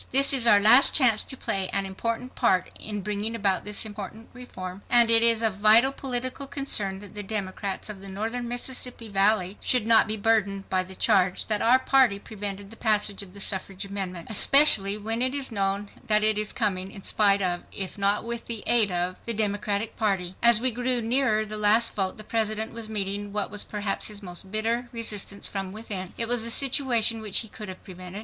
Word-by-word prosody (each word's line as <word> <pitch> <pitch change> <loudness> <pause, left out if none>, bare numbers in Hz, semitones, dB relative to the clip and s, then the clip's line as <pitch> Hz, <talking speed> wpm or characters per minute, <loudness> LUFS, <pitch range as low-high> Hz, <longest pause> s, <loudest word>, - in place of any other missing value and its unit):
"This 275 +2 +5
is 250 -3 +1
our 205 -3 +6
last 235 +6 +6
chance 245 -7 +3
to 265 - -6
play 195 -5 -2
an 195 0 -2
important 230 +6 -5
part 185 -7 0
in 210 -1 -4
bringing 210 +3 -2
about 200 -4 0
this 210 +1 -1
important 215 +1 -9
reform, 190 -7 -9
and 235 -1 +5
it 225 0 +6
is 230 -1 +3
of 215 -4 0
vital 220 +6 +5
political 255 0 -4
concern 210 -9 -2
that 205 -2 -12
the 210 - -5
Democrats 195 -1 -4
of 210 -3 -8
the 195 - -9
Northern 225 +5 -4
Mississippi 245 -1 -4
Valley 200 -1 +1
should 250 -4 +1
not 225 -1 +4
be 215 0 -1
burdened 200 -2 0
by 185 -1 +1
the 185 +1 -9
charge 190 -4 +1
that 210 -2 -2
our 240 +3 +5
party 260 -5 +2
prevented 200 -1 -7
the - - -11
passage 210 -3 0
of 195 -1 -12
the - - -11
suffrage 195 0 -3
amendment, 190 -3 -6
especially 215 -4 +6
when 225 +3 -3
it 260 +2 +2
is 275 -3 +1
known 200 -1 -2 0.2
that 215 0 +3
it 215 0 +4
is 210 0 -2
coming 195 -5 -2
in 195 -2 -11
spite 200 -2 +2
of, 175 -1 -2
if 190 -2 -5
not 200 0 +1
with 235 0 -6
the 230 -3 -4
aid 235 -4 +4
of, 180 0 -2
the 230 - -2
Democratic 205 0 -2
Party." 190 -4 -1
As 235 -2 +5
we 255 +2 +1
grew 245 +1 0
nearer 225 -2 +1
the 215 0 -6
last 210 +3 +3
vote 190 -2 -3
the 215 - -8
President 220 0 -2
was 225 -1 -6
meeting 205 -1 -3
what 205 -2 -3
was 210 0 -2
perhaps 205 -1 -2
his 210 -1 -5
most 180 +1 -6
bitter 230 +4 -2
resistance 210 -3 -2
from 195 -2 -5
within. 200 -3 -7
It 230 - -1
was 240 -1 +2
a 230 - 0
situation 240 -4 +2
which 210 -3 +1
he 225 - -7
could 210 -1 -9
have 185 - -10
prevented. 185 0 -9
210 Hz, 210 wpm, -25 LUFS, 195-230 Hz, 0.2 s, our